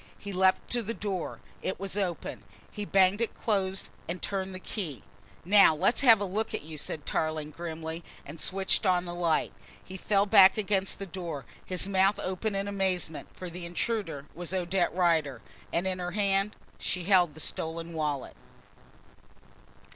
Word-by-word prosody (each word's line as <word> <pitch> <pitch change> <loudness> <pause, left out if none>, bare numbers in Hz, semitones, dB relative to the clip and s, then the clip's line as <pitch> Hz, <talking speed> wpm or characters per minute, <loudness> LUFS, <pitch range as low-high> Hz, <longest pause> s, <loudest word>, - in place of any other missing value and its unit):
He 200 -1 -7
leapt 185 0 +3
to 240 - +2
the 230 +1 -4
door, 195 -4 -4 0.2
it 190 - -3
was 195 0 -4
open. 190 -4 -2 0.3
He 210 -1 -4
banged 195 +2 +4
it 230 - -1
close 195 -3 0 0.2
and 175 +2 -3
turned 190 0 -3
the - - -6
key. 170 - -4 0.4
"Now, 195 -4 +7
let's 195 - +2
have 230 -6 +8
a 205 - -1
look 205 +4 -2
at - - -4
you," 155 0 -8
said 150 +1 -3
Tarling 155 -1 -1
grimly 165 +1 -5 0.2
and 155 +2 -9
switched 195 +2 +2
on 180 -1 +3
the 175 - -4
light. 170 -2 +1 0.3
He 190 - -7
fell 200 +1 +2
back 195 0 +7
against 195 -2 0
the 195 - -5
door, 170 -6 -6 0.2
his 185 +1 -2
mouth 195 +1 +3
open 195 +3 -2
in 195 +1 -1
amazement, 190 -5 -1
for 185 - -7
the 175 +1 -7
intruder 170 -4 -2
was 175 +3 -4
Odette 180 0 +1
Rider, 160 -8 +2 0.3
and 175 - 0
in 185 -1 -1
her 175 0 -3
hand 195 0 +1 0.2
she 180 - -1
held 175 -5 +4
the - - -10
stolen 165 +2 -3
wallet. 150 -4 -2
185 Hz, 170 wpm, -29 LUFS, 165-195 Hz, 0.4 s, have